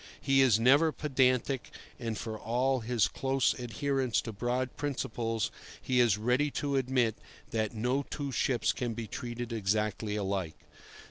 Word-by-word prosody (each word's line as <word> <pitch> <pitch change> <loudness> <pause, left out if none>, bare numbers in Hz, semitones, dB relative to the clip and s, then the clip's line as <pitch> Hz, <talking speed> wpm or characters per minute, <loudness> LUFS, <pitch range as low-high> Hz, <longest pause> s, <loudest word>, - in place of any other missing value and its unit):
He 135 -1 +3
is 120 -5 +5
never 140 +7 +5
pedantic, 130 -3 +1 0.3
and, 115 -3 -3
for 110 0 -4
all 125 +4 0
his 115 -4 +1
close 135 +5 +1
adherence 130 +1 0
to 115 - -6
broad 125 +4 -2
principles, 115 -6 -2 0.3
he 125 -1 0
is 115 -4 +4
ready 125 +7 +2
to 140 0 -2
admit 125 -4 +1 0.4
that 110 0 -1
no 125 +5 +1
two 140 -2 -4
ships 125 0 +1
can 120 -3 -3
be 115 - -4
treated 120 0 -5
exactly 105 0 -1
alike. 95 -5 -2
120 Hz, 145 wpm, -30 LUFS, 110-135 Hz, 0.4 s, is